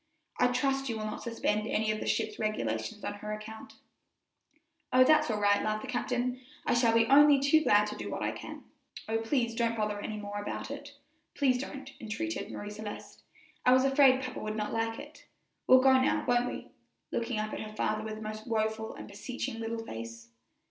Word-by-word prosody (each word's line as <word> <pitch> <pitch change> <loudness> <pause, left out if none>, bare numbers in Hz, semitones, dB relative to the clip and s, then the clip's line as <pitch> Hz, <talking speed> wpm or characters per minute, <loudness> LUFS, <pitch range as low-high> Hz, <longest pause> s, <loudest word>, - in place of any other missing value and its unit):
I 250 - +5
trust 270 +2 0
you 225 - -2
will 215 - -4
not 215 - -5
suspend 215 -2 -1
any 215 -1 +1
of 215 - -2
the - - -5
ship's 215 -1 -1
regulations 115 - -2
on - - -3
her 210 +1 -4
account." 215 +1 -9 1.2
"Oh, 255 0 +7
that's 305 +2 +4
all 215 -2 0
right," 205 0 +3
laughed 215 0 -1
the - - -6
captain, 250 0 -1 0.2
"I - - +2
shall 235 -1 +3
be 230 0 +5
only 285 +2 +7
too 280 +3 +4
glad 210 -8 +4
to 210 - -6
do - - -6
what - - -3
I - - 0
can." - - -9 0.4
"Oh, 225 0 0
please 235 0 0
don't 230 0 0
bother 210 -1 -1
any 215 - -4
more 205 0 -5
about 205 - -5
it 285 0 -8 0.4
please 255 -3 +2
don't," 270 0 -7
entreated 215 - -4
Marie 205 0 -6
Celeste; 210 0 -8 0.4
"I 250 - +6
was 260 +1 +5
afraid 270 -1 +5
papa 255 - -5
would 215 0 -4
not 210 -1 -3
like 225 0 -1
it. 290 +2 -12 0.4
We'll 255 0 +8
go 265 0 +7
now, 260 0 +2
won't 245 0 +3
we?" - - -8 0.4
looking 235 0 -2
up 215 0 -2
at - - -4
her 215 0 -8
father 215 0 -1
with 215 0 -5
a - - -9
most 215 +1 -6
woful 220 -1 -1
and - - -9
beseeching 225 +2 -5
little 225 0 -4
face. 115 - -8
225 Hz, 205 wpm, -30 LUFS, 215-255 Hz, 1.2 s, We'll